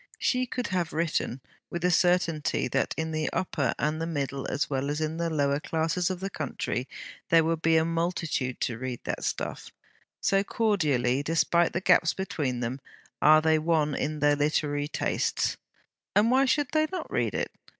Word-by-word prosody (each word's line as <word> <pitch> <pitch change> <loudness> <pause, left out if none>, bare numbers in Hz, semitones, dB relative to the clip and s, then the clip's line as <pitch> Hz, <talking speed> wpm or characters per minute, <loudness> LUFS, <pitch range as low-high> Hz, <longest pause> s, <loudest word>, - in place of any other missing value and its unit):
She 255 0 +1
could 250 0 -3
have 180 -3 -1
written, 155 -5 -1 0.3
with 175 0 -4
the 180 - +3
certainty 175 -4 +2
that - - 0
in 160 0 -2
the 155 0 -1
upper 140 -8 -1
and 155 +1 -1
the 165 - -1
middle 140 -4 -3
as 145 - -1
well 135 0 -2
as 150 +1 -1
in 155 +1 -2
the 170 0 -1
lower 140 -2 +1
classes 165 +4 -1
of 185 -1 -4
the 195 - -2
country, 130 -4 -3 0.4
there 165 -2 +6
would 165 0 -1
be 165 0 +4
a 160 - +3
multitude 165 -6 -1
to 115 -2 -2
read 130 -2 -4
that - - -4
stuff, - - -3 0.5
so 195 0 +2
cordially, 150 - +1
despite 165 +2 +2
the 175 - -1
gaps 180 -3 +4
between 140 -10 -2
them, 125 +3 -3 0.4
are 155 +1 +6
they 160 -1 +4
one 155 -2 +1
in 155 +2 -2
their 145 0 +4
literary 145 0 0
tastes. - - -1 0.6
And 220 +3 +4
why 265 +2 +4
should 285 +1 +1
they 310 -1 +2
not 375 - -5
read - - 0
it? - - -2
160 Hz, 180 wpm, -27 LUFS, 145-175 Hz, 0.6 s, there